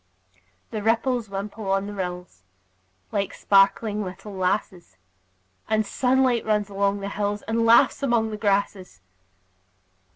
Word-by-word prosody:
The 215 - -3
ripples 230 +1 0
wimple 200 +1 -5
on 195 0 +1
the 205 - -6
rills, 180 - -6 0.7
Like 200 -2 -2
sparkling 205 +2 +2
little 195 +2 -8
lasses; 185 - -2 0.7
The 220 0 +2
sunlight 250 +2 +1
runs 210 -1 0
along 200 0 0
the 200 - -4
hills, 205 0 -2
And 230 +1 0
laughs 230 +5 +5
among 235 -5 +1
the 215 - -5
grasses. 200 - -1
205 Hz, 125 wpm, -24 LUFS, 195-225 Hz, 0.7 s, laughs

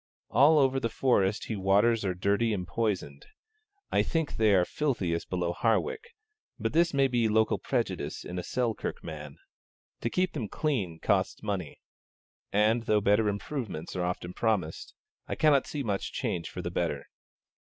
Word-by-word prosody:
All 145 +7 +6
over 135 -2 +3
the 115 - -1
Forest 105 -5 +1
he 110 - -3
waters 105 +4 +3
are 95 -2 -1
dirty 100 +5 +1
and 90 -2 -4
poisoned: 90 -9 -2 0.6
I - - +3
think 160 -2 -1
they 110 -2 +4
are 90 -1 +4
filthiest 95 - -1
below 90 -1 -1
Hawick; 455 - -1 0.4
but 115 0 -2
this 165 +1 +4
may 140 -1 +3
be 120 -3 +1
mere 105 - 0
local 110 -1 +3
prejudice - - -2
in 90 +1 -4
a - - -4
Selkirk 120 +2 -2
man. 75 -3 -8 0.6
To 115 - -1
keep 185 +7 0
them 115 -9 -4
clean 115 - -1
costs 100 +1 0
money; 95 -7 -4 0.7
and, 110 +3 +2
though 105 - +4
improvements 105 - -1
are 90 - -1
often 90 0 -3
promised, 105 -9 -1 0.3
I - - -3
cannot 150 -3 +4
see 145 -2 -3
much 100 -4 -2
change 85 -2 -3
for - - -6
the - - -3
better. - - -1
110 Hz, 165 wpm, -29 LUFS, 90-130 Hz, 0.7 s, All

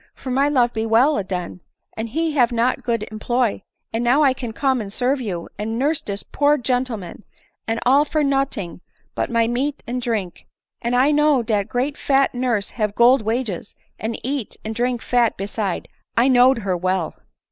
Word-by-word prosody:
for 260 - -6
my 275 +3 +2
love 245 -4 +2
be 220 - -1
well 235 +7 +3
aden, 180 -2 -4 0.3
and 225 +1 -4
he 320 +6 0
have 255 -6 +3
got 235 +2 +1
good 230 -3 -2
employ; 235 +1 0 0.3
and 225 +1 -1
now 260 +5 +4
I 270 -2 +4
can 245 -3 -6
come 265 +1 0
and 200 -2 -6
serve 260 +5 0
you, 180 -7 -4
and 220 +2 -2
nurse 290 +5 +1
dis 200 0 -5
poor 290 +1 +2
gen 250 -1 +1
tleman, 210 -9 -7 0.5
and 225 0 -1
all 275 +4 +5
for 300 0 0
noting 270 - -1 0.3
but - - -2
my 230 -1 +2
meat 270 +5 -2
and 250 +1 -3
drink; 220 -7 -3 0.3
and 240 +1 0
I 265 +4 +4
know 295 -4 +3
dat 210 -3 0
great 265 +4 -1
fat 275 -1 +2
nurse 245 -5 -1
have 210 -1 0
gold 245 +2 +5
wages, 220 -3 -3 0.2
and 220 +1 -3
eat 265 -2 -3
and 220 - -3
drink 245 +1 -1
fat 240 -2 +2
beside 200 -1 -3 0.2
— - - -47
I 245 +3 +5
knowd 255 0 +5
her 190 -2 0
well." 185 -1 -1
240 Hz, 190 wpm, -21 LUFS, 215-265 Hz, 0.5 s, all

